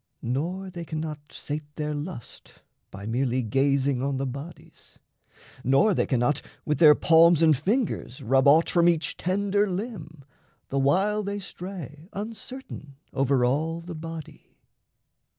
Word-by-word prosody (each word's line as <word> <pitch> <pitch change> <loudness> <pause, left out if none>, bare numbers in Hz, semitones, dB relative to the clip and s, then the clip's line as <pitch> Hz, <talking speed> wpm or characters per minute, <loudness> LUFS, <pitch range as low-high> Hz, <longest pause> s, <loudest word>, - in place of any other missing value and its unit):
Nor 175 +10 -2
they 175 -2 -6
cannot 155 -2 -4
sate 150 0 -6
their 150 -1 -2
lust 145 -3 -8 0.3
By 100 +1 -9
merely 125 +2 0
gazing 135 +2 +1
on 140 0 -1
the 135 - -2
bodies, 140 +6 -9 0.7
nor 140 - +4
They - - 0
cannot 130 +2 +1 0.2
with 150 - 0
their 150 -3 +8
palms 165 +1 +5
and 160 -2 +6
fingers 190 - -1
rub 135 +1 +2
Aught 155 +4 +6
from 175 -1 +4
each 160 -3 0
tender 200 +3 +1
limb, 180 - -6 0.4
the 140 - 0
while 195 +10 +2
they 200 0 -3
stray 180 -5 -8
Uncertain 215 - -8 0.2
over 135 -2 +2
all 160 +6 0
the 170 +1 -8
body. 165 -1 -9
155 Hz, 135 wpm, -26 LUFS, 135-180 Hz, 0.7 s, their